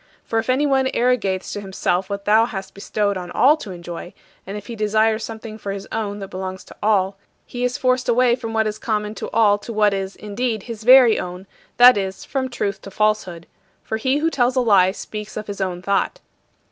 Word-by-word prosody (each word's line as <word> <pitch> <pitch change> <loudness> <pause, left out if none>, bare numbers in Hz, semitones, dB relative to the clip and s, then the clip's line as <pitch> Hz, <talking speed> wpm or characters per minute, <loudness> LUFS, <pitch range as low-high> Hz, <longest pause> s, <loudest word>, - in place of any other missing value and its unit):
For 225 - 0
if 225 - -4
anyone 265 0 +2
arrogates 215 -7 0
to 205 - -4
himself 190 -1 -1
what 200 0 -4
thou 220 +2 +4
hast 195 -5 -7
bestowed 200 0 -1
on 180 -1 -6
all 280 +10 +5
to 215 - -9
enjoy, 175 -1 -8 0.3
and 200 +2 -5
if 205 - -9
he 235 - -7
desires 215 +1 +1
something 220 -1 -7
for 200 - -4
his 195 0 -7
own 205 -2 -3
that 195 -2 -7
belongs 185 0 -6
to - - -15
all, 195 -2 +2 0.3
he 245 0 -5
is 250 0 0
forced 255 -1 +1
away 240 0 +4
from 235 -3 -6
what 220 0 +1
is 215 0 -3
common 210 -2 -2
to - - -6
all 210 -2 +3
to 220 - -8
what 210 -2 +3
is, 195 0 -3
indeed, 215 +1 -3
his 230 -3 -7
very 250 -1 +7
own 180 +1 -6 0.3
that 245 -1 +8
is, 190 -1 -4
from 260 -2 -2
truth 200 -5 -3
to - - -9
falsehood. 195 -5 -1 0.4
For 220 - -3
he 260 +5 +1
who 325 +2 0
tells 250 -2 +1
a - - +3
lie 195 -6 +4
speaks 210 +1 -7
of 215 - -4
his 200 -1 -6
own 180 -1 -3
thought. 200 - 0
215 Hz, 215 wpm, -21 LUFS, 195-240 Hz, 0.4 s, that